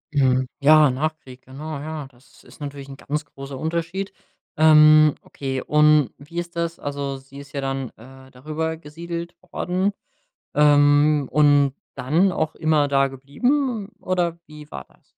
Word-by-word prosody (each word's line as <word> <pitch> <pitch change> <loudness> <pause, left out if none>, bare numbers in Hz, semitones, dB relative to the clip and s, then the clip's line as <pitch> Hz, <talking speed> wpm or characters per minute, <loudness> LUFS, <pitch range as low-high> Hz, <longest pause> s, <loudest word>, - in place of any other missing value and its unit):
Mhm, 130 -2 +3
ja, 150 +1 +6
Nachkrieg, 135 -2 -5
genau, 145 +3 -7
ja. 155 -2 -6
Das 125 +2 -23
ist - - -17
natürlich 140 -1 -7
'n 135 - -10
ganz 150 +1 -4
großer 135 -1 -9
Unterschied. 170 +5 -3 0.4
Ähm, 155 -1 +7
okay 135 -2 -5
und 150 -2 +4
wie 160 +4 -12
ist 175 0 -7
das? 170 0 -2
Also, 140 -1 -4
sie 135 +1 -15
ist 140 -1 -13
ja 140 - -3
dann, 135 -2 -3
äh, 130 +3 -15
darüber 155 +5 -4
gesiedelt 170 +2 -7 0.2
worden, 185 +3 -1 0.6
ähm, 145 0 +4
und 145 -2 +4 0.2
dann 165 +9 +2
auch 160 -2 -2
immer 155 -2 +2
da 135 -1 +2
geblieben 215 - -1
oder 175 -2 -1
wie 150 -1 -13
war - - -7
das? - - -28
150 Hz, 150 wpm, -22 LUFS, 135-160 Hz, 0.6 s, Ähm